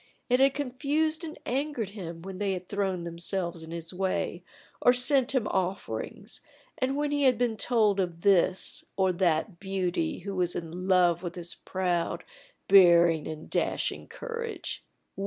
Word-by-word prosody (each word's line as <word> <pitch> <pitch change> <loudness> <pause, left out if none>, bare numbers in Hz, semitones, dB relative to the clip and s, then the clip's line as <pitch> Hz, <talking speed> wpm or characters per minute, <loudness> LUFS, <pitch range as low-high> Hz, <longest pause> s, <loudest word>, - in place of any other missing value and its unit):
It 250 - +4
had 270 0 +4
confused 290 +4 0
and 315 -1 -7
angered 265 -4 -2
him 170 -5 -8
when 190 0 -7
they 200 -2 0
had 180 -1 -6
thrown 190 -3 -2
themselves 170 0 -3
in 160 - -10
his 165 +1 -5
way 190 +1 -2 0.4
or 245 - +6
sent 260 +1 +5
him 245 -4 +1
offerings, 190 +1 -3 0.3
and 260 +1 -1
when 295 0 0
he 290 0 0
had 255 -3 +4
been 240 -1 0
told 215 -4 +2
of 175 -3 -2
this 190 -1 +2
or 190 -1 +3
that 170 0 0
beauty 185 - -1
who 200 +2 -5
was 180 -1 0
in 175 +2 -5
love 175 -3 +4
with 175 -1 -5
his 175 -1 -6
proud, 175 -2 -2 0.4
bearing 170 -4 +6
and 155 0 -7
dashing - - -1
courage. 465 -2 -5
190 Hz, 155 wpm, -28 LUFS, 175-245 Hz, 0.4 s, or